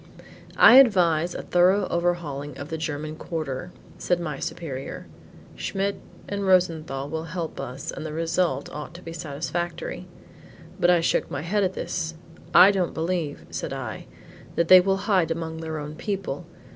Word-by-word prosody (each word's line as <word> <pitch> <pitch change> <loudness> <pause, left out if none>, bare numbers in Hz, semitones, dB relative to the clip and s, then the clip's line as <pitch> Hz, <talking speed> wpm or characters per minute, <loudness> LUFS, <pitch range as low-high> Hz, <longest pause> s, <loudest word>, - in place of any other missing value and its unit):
"I 255 - +9
advise 175 -9 +5
a - - -5
thorough 185 +3 +3
overhauling 155 -5 -2
of 140 +2 -7
the 160 - -3
German 155 0 -4
quarter," 160 0 -4 0.3
said 180 -1 +1
my 155 -5 -4
superior. 140 -6 -5 0.5
"Schmidt, 200 +1 -2 0.3
and 200 0 -3
Rosenthal 160 -7 +2
will 160 +2 -4
help 165 0 -5
us 130 +3 -5
and - - -7
the 155 - -5
result 165 -2 0
ought 150 +3 -7
to 180 - -11
be 165 - -7
satisfactory." 170 +3 -4 0.7
But 175 - +4
I 175 -1 +5
shook - - +1
my 140 +1 -4
head 205 +4 +1
at 185 -1 0
this. 165 -2 -3 0.4
"I 185 +3 +8
don't 185 -4 -1
believe," 165 -3 -2
said - - -4
I, - - -6 0.5
"that 170 -1 +1
they 185 - +11
will 195 +1 +1
hide 185 -6 +3
among 165 -1 -3
their 160 -1 -4
own 150 0 -6
people. 180 -4 -4
165 Hz, 160 wpm, -25 LUFS, 155-180 Hz, 0.7 s, they